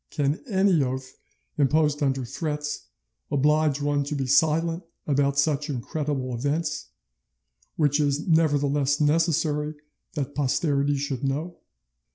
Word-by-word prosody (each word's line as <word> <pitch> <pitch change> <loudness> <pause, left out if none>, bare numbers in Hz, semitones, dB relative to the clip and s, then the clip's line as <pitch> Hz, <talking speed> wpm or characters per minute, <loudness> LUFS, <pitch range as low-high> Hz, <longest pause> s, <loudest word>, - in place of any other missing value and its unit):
Can 145 - -1
any 190 - +3
oath 130 0 -4 0.4
imposed 150 +1 +2
under 135 -2 0
threats 150 +2 -4 0.4
oblige 150 0 +2
one 145 0 +1
to 150 +1 -3
be 135 -2 -1
silent 160 +5 +2 0.2
about 140 -1 +1
such 145 +1 +1
incredible 135 0 -3
events, 145 - -2 0.9
which 145 -1 +2
it 150 - +3
is 145 +4 -2
nevertheless 145 -3 +2
necessary 150 -1 +1 0.4
that 145 -2 -3
posterity 145 0 +1
should 135 -2 -3
know? 150 +6 -2
145 Hz, 120 wpm, -25 LUFS, 140-155 Hz, 0.9 s, any